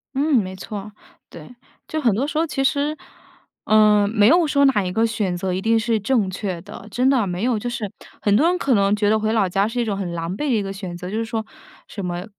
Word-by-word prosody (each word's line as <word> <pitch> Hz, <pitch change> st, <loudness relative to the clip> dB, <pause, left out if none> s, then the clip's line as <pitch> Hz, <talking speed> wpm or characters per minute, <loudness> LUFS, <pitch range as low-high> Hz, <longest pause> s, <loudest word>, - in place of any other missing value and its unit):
嗯， 290 Hz, +1 st, +2 dB
没 190 Hz, -5 st, 0 dB
错， 200 Hz, +2 st, -7 dB, 0.4 s
对。 170 Hz, +9 st, -12 dB, 0.3 s
就 315 Hz, -, -3 dB
很 235 Hz, -7 st, +3 dB
多 250 Hz, +8 st, -1 dB
时 300 Hz, +1 st, -4 dB
候 325 Hz, -, +2 dB
其 270 Hz, -4 st, -2 dB
实， 290 Hz, +3 st, 0 dB, 0.7 s
呃， 210 Hz, -1 st, +5 dB
没 210 Hz, -1 st, +3 dB
有 335 Hz, +6 st, +5 dB
说 285 Hz, -2 st, +3 dB
哪 255 Hz, -7 st, +3 dB
一 180 Hz, -, -3 dB
个 220 Hz, +4 st, +2 dB
选 210 Hz, -5 st, -2 dB
择 185 Hz, +1 st, -2 dB
一 185 Hz, -, -2 dB
定 225 Hz, +1 st, +2 dB
是 225 Hz, -1 st, 0 dB
正 215 Hz, -2 st, +1 dB
确 185 Hz, -2 st, -4 dB
的。 195 Hz, -, -11 dB
真 250 Hz, +5 st, +2 dB
的， 255 Hz, -6 st, +2 dB
没 180 Hz, +1 st, -3 dB
有， 245 Hz, -2 st, +1 dB
就 240 Hz, +3 st, -3 dB
是 235 Hz, -4 st, -4 dB, 0.3 s
很 205 Hz, -1 st, +3 dB
多 305 Hz, +9 st, +4 dB
人 360 Hz, -, +2 dB
可 275 Hz, -7 st, +1 dB
能 200 Hz, -1 st, +3 dB
觉 205 Hz, 0 st, +1 dB
得 220 Hz, -, +3 dB
回 215 Hz, 0 st, 0 dB
老 215 Hz, -4 st, +2 dB
家 195 Hz, +3 st, +1 dB
是 235 Hz, +2 st, -3 dB
一 235 Hz, -, +1 dB
种 200 Hz, -2 st, -2 dB
很 180 Hz, -3 st, -4 dB
狼 170 Hz, +1 st, -3 dB
狈 195 Hz, -, -7 dB
的 235 Hz, -, +3 dB
一 210 Hz, -, 0 dB
个 195 Hz, 0 st, -5 dB
选 190 Hz, -3 st, -7 dB
择， 180 Hz, +1 st, -7 dB
就 215 Hz, -, -3 dB
是 230 Hz, -, 0 dB
说， 225 Hz, -1 st, -3 dB, 0.4 s
什 200 Hz, -3 st, -6 dB
么： 175 Hz, +1 st, -4 dB
215 Hz, 280 characters per minute, -21 LUFS, 195-245 Hz, 0.7 s, 呃